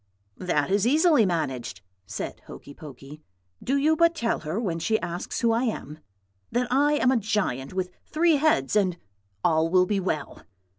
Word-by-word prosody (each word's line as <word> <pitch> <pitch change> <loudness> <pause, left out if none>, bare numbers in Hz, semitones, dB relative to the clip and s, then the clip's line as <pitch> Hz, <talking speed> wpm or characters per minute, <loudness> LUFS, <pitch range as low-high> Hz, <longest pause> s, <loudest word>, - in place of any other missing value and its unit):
"'That 150 -4 -1
is 200 +3 +2
easily 300 - +4
managed,' 130 - -3 0.3
said 105 - -6
Hokey 140 - -11
Pokey. 145 0 -12 0.4
'Do 275 +2 +1
you 305 +3 +3
but 335 +1 +3
tell 235 -7 -1
her, 160 +6 -4
when 175 -8 -2
she 220 +6 +1
asks 175 +1 -4
who 235 -2 +3
I 230 +3 +1
am, 155 - -5 0.5
that 245 +1 0
I 290 +3 +3
am 260 -3 +3
a 260 - +3
giant 190 - -2
with 185 -1 -3 0.2
three 325 0 +3
heads, 215 - +1
and 185 -4 +2 0.5
all 160 0 +2
will 180 +1 +4
be 200 +1 0
well.' 165 -6 -3
195 Hz, 170 wpm, -25 LUFS, 155-255 Hz, 0.5 s, easily